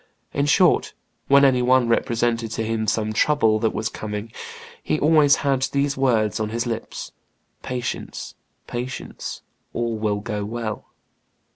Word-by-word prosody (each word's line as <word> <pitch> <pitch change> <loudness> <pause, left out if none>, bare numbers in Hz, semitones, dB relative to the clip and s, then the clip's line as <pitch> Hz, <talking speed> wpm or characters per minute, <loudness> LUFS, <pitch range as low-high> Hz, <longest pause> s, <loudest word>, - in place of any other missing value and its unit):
In 140 +1 +1
short, 175 +3 +3 0.3
when 140 0 +6
any 130 -2 +4
one 125 0 +4
represented 115 -1 +1
to 115 - -2
him 110 0 -1
some 110 0 0
trouble 110 -4 +3
that 110 0 +2
was 110 - -2
coming, 110 0 -5 0.5
he 75 - 0
always 150 -2 +5
had 135 -2 +2
these 140 0 +1
words 115 -6 +1
on 110 -1 -1
his 115 +2 -2
lips: 115 -2 -5 0.5
'Patience, 125 -1 -5 0.3
patience; 125 +2 -6 0.3
all 115 -1 -1
will 105 -1 0
go 105 -1 -3
well. 110 0 -4
115 Hz, 140 wpm, -23 LUFS, 110-135 Hz, 0.5 s, when